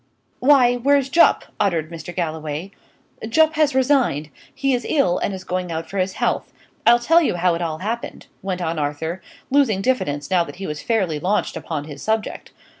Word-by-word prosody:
"Why, 250 -3 +5
where's 275 +2 +2
Jupp?" 335 +5 +4
uttered 170 -4 0
Mr. 170 +1 -8
Galloway. 160 +1 -3 0.6
"Jupp 315 +6 +4
has 305 -3 +2
resigned. 255 - +2 0.2
He 275 -1 0
is 245 - 0
ill, 230 - +2
and - - -1
is 190 -1 -6
going 180 -1 -3
out 160 0 -4
for 200 - -4
his 185 0 0
health. - - -1 0.4
I'll 240 - +8
tell 325 +8 +4
you 305 - +1
how 175 0 +2
it 170 - -3
all 160 -2 -2
happened," 225 +7 -5 0.2
went 185 -2 -3
on 165 -1 -2
Arthur, 155 +5 -3 0.3
losing 265 -8 +3
diffidence 145 - -1
now 180 -2 +4
that - - -10
he 190 +2 -6
was 150 -3 -5
fairly 190 -10 0
launched 195 +6 0
upon 155 -3 -4
his 145 -2 -10
subject. 220 0 -2
190 Hz, 190 wpm, -21 LUFS, 160-250 Hz, 0.6 s, I'll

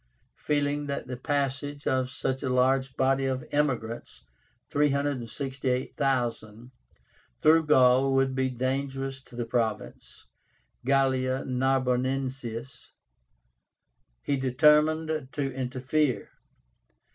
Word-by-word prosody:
Feeling 145 0 0
that 140 - -3
the 125 - -5
passage 145 +1 -2
of 130 -1 +1
such 130 +1 -3
a 135 - -2
large 130 +1 +2
body 135 0 +2
of 130 -1 -2
emigrants 125 - -2 0.5
(368,000) 130 -4 -1 0.7
through 160 +1 +5
Gaul 130 -1 +5
would 135 0 +2
be 130 0 0
dangerous 135 +1 -3
to 125 - -16
the 120 -1 -3
province 115 -2 -3 0.6
(Gallia 130 0 +1
Narbonensis), 130 -1 -1 1.3
he 140 - 0
determined 150 +3 +3
to 135 -2 -2
interfere. 130 +2 -1
130 Hz, 90 wpm, -27 LUFS, 125-140 Hz, 1.3 s, through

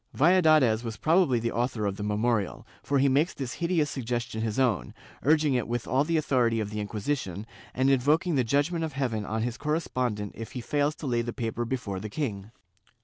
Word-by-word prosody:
Valladares 155 -8 +4
was 115 -2 -5
prob 175 +4 +4
ably 125 -3 +1
the 115 +1 -1
author 120 -2 -1
of 100 -1 -1
the 105 - -8
memorial, 105 0 -1 0.2
for 140 - 0
he 135 +1 +4
makes 145 +6 +2
this 130 -3 -4
hideous 170 -4 +1
sug 130 - -4
gestion 120 -1 -2
his 110 -2 -2
own, 125 -8 +1 0.3
urging 150 -1 +3
it 125 -3 0
with 120 0 -3
all 135 +2 +2
the 165 +2 0
authority 125 -7 +2
of 105 -1 -3
the 105 - -4
Inquisition, 105 -1 -3 0.3
and 130 +1 +2
invoking 145 +6 +3
the 130 -3 +2
judgement 145 +8 +1
of 160 -2 -3
heaven 120 -6 -2
on 110 +1 -1
his 120 0 -3
correspondent 130 -9 -1
if 115 - -8
he 125 - -4
fails 145 +4 0
to - - -8
lay 120 -3 +1
the 120 0 -4
paper 120 -1 -3
before 115 -6 -3
the 105 +2 -6
king. 105 -5 -4
125 Hz, 210 wpm, -27 LUFS, 110-145 Hz, 0.3 s, Valladares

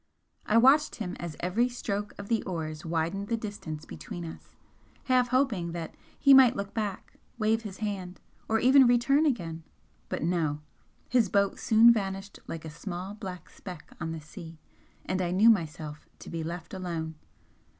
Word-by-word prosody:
I 215 - +4
watched 275 +6 +5
him 190 -5 -4
as 170 -3 -5
every 220 +8 +1
stroke 205 -4 -3
of 200 - -7
the 230 0 +1
oars 155 -4 -5
widened 170 +4 -2
the 230 - 0
distance 200 -8 -6
between 175 -1 -7
us, 160 - -11 0.5
half 255 -1 +3
hoping 240 -10 +1
that 170 -2 -5 0.2
he 275 -1 +6
might 265 -3 +8
look 200 0 -4
back, 210 -4 -4 0.2
wave 220 0 +2
his 205 -4 -8
hand, 195 -4 -4 0.3
or 225 - +3
even 260 +3 +6
return 260 +6 +4
again 165 - -2 0.5
but - - -3
no! 160 -4 0 0.5
his 240 -6 +3
boat 200 0 +1
soon 230 +2 +7
vanished 195 -2 -4
like 165 -1 -6
a - - -5
small 180 +4 -6
black 190 -5 -8
speck 180 -5 -10
on 165 -1 -2
the 160 -1 -5
sea, 160 +2 -11 0.5
and 185 0 -1
I 175 - 0
knew 205 +6 +6
myself 155 -6 -3
to - - -10
be 165 -1 -3
left 170 +2 -6
alone. 170 -4 -4
195 Hz, 170 wpm, -29 LUFS, 165-225 Hz, 0.5 s, might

